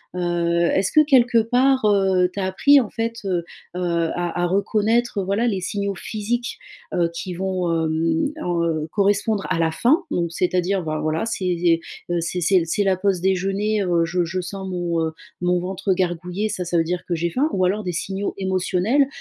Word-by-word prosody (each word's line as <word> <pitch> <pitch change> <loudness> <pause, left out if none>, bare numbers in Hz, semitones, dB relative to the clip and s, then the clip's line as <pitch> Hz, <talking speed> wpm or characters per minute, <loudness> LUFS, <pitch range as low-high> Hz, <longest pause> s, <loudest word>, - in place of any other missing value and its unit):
Heu, 170 -1 0
est-ce 195 0 +1
que 305 - +6
quelque 245 -4 +4
part, 250 +2 +2
heu, 190 -3 +3
tu - - -5
as 190 - 0
appris 280 +9 +5
en 225 - -5
fait, 230 0 -3
heu, 180 -3 0 0.3
à 175 0 -1
à - - +1
à - - +3
reconnaître, 215 +3 +1
voilà, 200 +6 0
les 195 -4 -1
signaux 200 +1 -2
physiques, 230 +5 -3 0.4
heu, 170 -1 +1
qui 180 +2 -5
vont, 185 -2 -1
hem, 160 - 0
heu, 170 -3 -1
correspondre 205 +1 +1
à 175 -2 0
la 165 -1 +2
faim? 280 - +2
Donc 170 -1 -1
c'est-à-dire, 180 +1 0
ben, 155 -1 -2
voilà, 155 +6 -1
c'est 220 -5 -3
des, 170 -1 +2 0.3
heu, 175 -1 0
c'est 175 +2 -2
c'est 185 +2 +4
c'est 165 - -2
c'est 200 +5 0
la 190 -2 +2
pause 190 -2 0
déjeuner, 195 +3 0
heu, 170 -2 +2
je 175 +2 0
je 185 +2 -3
sens 190 +1 -6
mon, 175 -2 -2
heu, - - -4 0.3
mon 180 0 +2
ventre 185 +1 -1
gargouiller, 180 +3 -2
ça, 180 - -3
ça 175 0 0
veut 165 - +3
dire 180 +2 -3
que 175 - -1
j'ai 170 +1 -1
faim 275 - +1
ou 185 - 0
alors 205 +3 0
des 180 - -2
signaux 190 +4 -3
émotionnels 190 +8 +1
185 Hz, 200 wpm, -22 LUFS, 175-205 Hz, 0.4 s, que